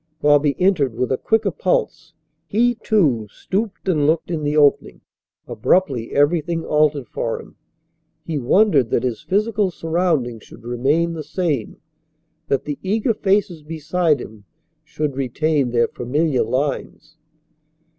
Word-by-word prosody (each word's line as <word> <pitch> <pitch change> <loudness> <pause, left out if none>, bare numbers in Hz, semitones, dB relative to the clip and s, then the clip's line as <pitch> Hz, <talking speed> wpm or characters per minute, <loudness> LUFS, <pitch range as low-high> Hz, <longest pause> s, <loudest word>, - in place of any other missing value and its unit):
Bobby 145 -1 +3
entered 165 - +2
with 125 +2 -1
a - - +3
quicker 220 -3 +1
pulse. 160 -2 -1 0.3
He, 240 +6 +2
too, 160 - +1
stooped 200 - -4
and 150 -6 +2
looked 160 +2 0
in 160 -2 -2
the 150 +1 -1
opening. 145 -2 +2 0.5
Abruptly 135 -11 0
everything 165 +3 +1
altered 150 -4 +1
for 115 +2 -3
him. - - -14 0.7
He 160 -3 -2
wondered 140 - +3
that 115 - 0
his 125 -3 -2
physical 210 0 0
surroundings 160 -9 -1
should - - -15
remain 140 +8 0
the 160 -2 -5
same, 150 - -2 0.7
that 140 - 0
the 145 -1 -4
eager 220 +5 0
faces 195 -5 0
beside 160 +1 0
him 105 -2 -11 0.4
should 150 -2 -3
retain 140 +1 0
their 120 -1 +2
familiar 140 +3 -1
lines. 145 +5 -3
155 Hz, 135 wpm, -20 LUFS, 135-180 Hz, 0.7 s, Bobby